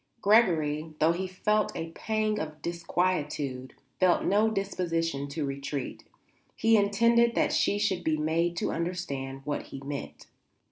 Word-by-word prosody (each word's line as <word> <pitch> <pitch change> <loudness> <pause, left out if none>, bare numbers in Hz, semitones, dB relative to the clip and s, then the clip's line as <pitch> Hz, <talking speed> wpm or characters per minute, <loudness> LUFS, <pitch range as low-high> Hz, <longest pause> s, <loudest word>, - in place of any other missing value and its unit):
Gregory, 160 -8 +3
though 160 +2 +4
he 185 +3 -2
felt 210 +3 0
a 165 0 -4
pang 215 +3 -1
of 155 -2 -5
disquietude, 155 -6 -2 0.3
felt 185 -2 +4
no 210 +3 +3
disposition 165 -8 -2
to 145 +1 -3
retreat. 140 0 -4 0.5
He 225 +1 +4
intended 230 +3 +3
that - - +2
she 205 - +2
should 205 -3 0
be 155 -1 +1
made 165 +3 0
to - - -1
understand 140 -6 -4
what 145 0 -3
he 135 - -8
meant. 140 0 -6
170 Hz, 140 wpm, -28 LUFS, 150-200 Hz, 0.5 s, though